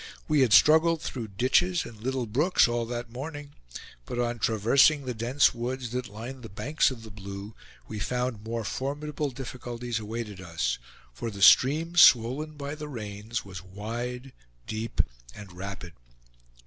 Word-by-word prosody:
We 155 Hz, -2 st, +3 dB
had 130 Hz, -4 st, +4 dB
struggled 160 Hz, +7 st, +6 dB
through 120 Hz, -6 st, -5 dB
ditches 175 Hz, -, +2 dB
and 110 Hz, -2 st, -11 dB
little 130 Hz, +1 st, -1 dB
brooks 145 Hz, -, +3 dB
all 120 Hz, -1 st, -1 dB
that 120 Hz, -1 st, -5 dB
morning; 145 Hz, +3 st, -7 dB, 0.6 s
but 125 Hz, -, -4 dB
on 120 Hz, -1 st, -1 dB
traversing 130 Hz, +7 st, +4 dB
the 125 Hz, -, -2 dB
dense 120 Hz, +5 st, +3 dB
woods 125 Hz, 0 st, -4 dB
that 125 Hz, 0 st, -3 dB
lined 120 Hz, +5 st, -8 dB
the 115 Hz, -, -9 dB
banks 150 Hz, +10 st, +1 dB
of 125 Hz, -4 st, -8 dB
the 110 Hz, -, -10 dB
Blue, 100 Hz, +1 st, -8 dB, 0.3 s
we 105 Hz, -, -6 dB
found 125 Hz, -1 st, -2 dB
more 115 Hz, +1 st, -3 dB
formidable 145 Hz, +5 st, -3 dB
difficulties 120 Hz, -2 st, -5 dB
awaited 105 Hz, -2 st, -6 dB
us, 80 Hz, -9 st, -2 dB, 0.3 s
for 115 Hz, -, -4 dB
the 100 Hz, -2 st, -3 dB
stream, 155 Hz, +10 st, +6 dB
swollen 130 Hz, +3 st, +6 dB
by 145 Hz, -1 st, -6 dB
the 150 Hz, 0 st, -7 dB
rains, 110 Hz, -3 st, -5 dB
was 95 Hz, -3 st, -8 dB
wide, 120 Hz, +7 st, -6 dB, 0.3 s
deep, 110 Hz, +1 st, -1 dB, 0.3 s
and 100 Hz, -3 st, -11 dB
rapid. 95 Hz, -1 st, -7 dB
120 Hz, 155 wpm, -27 LUFS, 110-135 Hz, 0.6 s, struggled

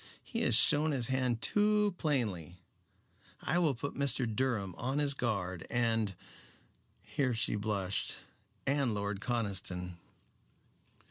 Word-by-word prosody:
He -, -, -4 dB
has 115 Hz, -, +4 dB
shown 150 Hz, +6 st, +5 dB
his 125 Hz, -3 st, -1 dB
hand 130 Hz, -3 st, 0 dB
too 210 Hz, -1 st, +3 dB
plainly. 105 Hz, -, -1 dB, 0.8 s
I 175 Hz, -, 0 dB
will 155 Hz, -6 st, +2 dB
put 140 Hz, +5 st, -5 dB
Mr. 135 Hz, -2 st, 0 dB
Durham 110 Hz, -4 st, -1 dB
on 130 Hz, +3 st, -2 dB
his 145 Hz, -1 st, +3 dB
guard, 100 Hz, -9 st, -3 dB
and" 115 Hz, -4 st, 0 dB, 0.9 s
here 130 Hz, -5 st, -1 dB
she 115 Hz, -, +2 dB
blushed 100 Hz, -2 st, -1 dB, 0.5 s
"and 135 Hz, -5 st, +1 dB
Lord 100 Hz, -1 st, -3 dB
Conniston." 95 Hz, -6 st, -2 dB
120 Hz, 120 wpm, -32 LUFS, 100-140 Hz, 0.9 s, shown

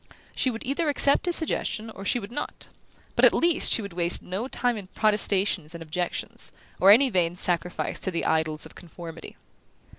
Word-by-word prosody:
She 260 Hz, -, +1 dB
would 230 Hz, -2 st, -6 dB
either 290 Hz, +5 st, -1 dB
accept 285 Hz, +3 st, +5 dB
his 350 Hz, -, +5 dB
suggestion, 225 Hz, -8 st, -1 dB
or 195 Hz, -, -10 dB
she 200 Hz, -, +1 dB
would 210 Hz, -2 st, -8 dB
not: 295 Hz, -, -7 dB, 0.5 s
but -, -, 0 dB
at -, -, +7 dB
least 340 Hz, -1 st, +2 dB
she 225 Hz, -, +3 dB
would 200 Hz, -3 st, -8 dB
waste 170 Hz, 0 st, -1 dB
no 195 Hz, +7 st, -4 dB
time 245 Hz, -2 st, -1 dB
in 200 Hz, -4 st, -8 dB
protestations 195 Hz, -5 st, +1 dB
and 165 Hz, -, -8 dB
objections, 175 Hz, +2 st, -4 dB, 0.3 s
or 190 Hz, -, +5 dB
any 250 Hz, +6 st, +6 dB
vain 175 Hz, -3 st, 0 dB
sacrifice 180 Hz, 0 st, -2 dB
to -, -, 0 dB
the 170 Hz, -2 st, -3 dB
idols 160 Hz, -1 st, -1 dB
of -, -, -13 dB
conformity. 170 Hz, -1 st, -11 dB
195 Hz, 185 wpm, -25 LUFS, 175-245 Hz, 0.5 s, at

